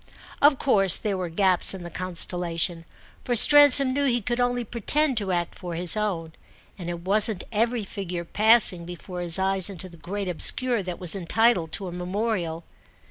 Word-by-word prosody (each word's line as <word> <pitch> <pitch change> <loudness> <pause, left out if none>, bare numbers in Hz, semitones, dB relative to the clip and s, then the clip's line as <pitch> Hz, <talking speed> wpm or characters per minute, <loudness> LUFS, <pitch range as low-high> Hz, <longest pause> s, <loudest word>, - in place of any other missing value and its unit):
Of 285 -1 +4
course 195 - +3
there 210 -3 -3
were 180 -2 -5
gaps 185 +2 +1
in 185 - -10
the 170 - -9
constellation, 175 -1 -3 0.4
for 245 - -2
Stransom 280 +1 +7
knew 285 +1 -1
he 245 -2 +1
could 240 +2 -4
only 245 0 -1
pretend 260 +6 -1
to 200 -3 -1
act 175 -1 -3
for 175 -3 -8
his 175 +2 +2
own, 180 -7 -4 0.5
and 175 -1 -7
it 170 -1 -6
wasn't 200 +1 +2
every 230 +1 -1
figure 180 -3 -7
passing 215 -3 +3
before 175 +1 -9
his 170 -2 +2
eyes 190 0 0
into 185 -2 -7
the 170 - -16
great 195 +4 -6
obscure 235 +6 +2
that 180 -2 -7
was 180 0 -1
entitled 190 -2 0
to 195 -1 -3
a - - -7
memorial. 180 -2 -4
190 Hz, 180 wpm, -23 LUFS, 175-230 Hz, 0.5 s, Stransom